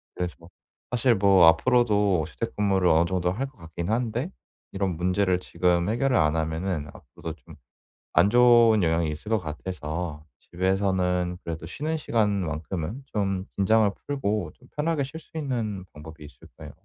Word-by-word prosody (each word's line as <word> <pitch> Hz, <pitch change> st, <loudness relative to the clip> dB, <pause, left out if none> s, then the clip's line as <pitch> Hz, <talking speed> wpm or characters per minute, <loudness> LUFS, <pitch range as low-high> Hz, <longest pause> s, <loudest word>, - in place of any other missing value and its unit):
그래서 90 Hz, -1 st, -3 dB, 0.6 s
사실 125 Hz, -1 st, +3 dB
뭐 95 Hz, -3 st, +5 dB
앞으로도 105 Hz, -, +3 dB
재택근무를 95 Hz, +3 st, 0 dB
어느 80 Hz, +2 st, +4 dB
정도 90 Hz, 0 st, 0 dB
할 130 Hz, +8 st, -3 dB
것 130 Hz, -4 st, -20 dB
같긴 85 Hz, +3 st, -6 dB
한데 120 Hz, +6 st, -1 dB, 0.4 s
이런 95 Hz, -4 st, -1 dB
문제를 90 Hz, +1 st, +1 dB
지금 90 Hz, -1 st, 0 dB
해결을 130 Hz, +2 st, +1 dB
안 75 Hz, 0 st, +3 dB
하면은 80 Hz, 0 st, -2 dB
앞으로도 75 Hz, +5 st, -9 dB
좀 80 Hz, -2 st, -14 dB, 0.6 s
안 100 Hz, +4 st, +5 dB
좋은 120 Hz, -3 st, +6 dB
영향이 80 Hz, -1 st, +1 dB
있을 80 Hz, +8 st, -8 dB
것 110 Hz, -, +3 dB
같아서 80 Hz, -1 st, -5 dB, 0.2 s
집에서는 90 Hz, -1 st, 0 dB
그래도 80 Hz, -1 st, -5 dB
쉬는 155 Hz, -, -3 dB
시간 110 Hz, -7 st, +1 dB, 0.2 s
만큼은 80 Hz, -, -4 dB
좀 95 Hz, -3 st, -1 dB
긴장을 105 Hz, +1 st, +3 dB, 0.2 s
풀고 105 Hz, -, -2 dB
좀 125 Hz, -, -22 dB
편하게 150 Hz, -1 st, 0 dB
쉴 160 Hz, +5 st, -8 dB
수 160 Hz, -, -16 dB
있는 115 Hz, -10 st, -3 dB
방법이 75 Hz, 0 st, -11 dB
있을까요? 75 Hz, -, -13 dB
95 Hz, 325 characters per minute, -26 LUFS, 85-115 Hz, 0.6 s, 좋은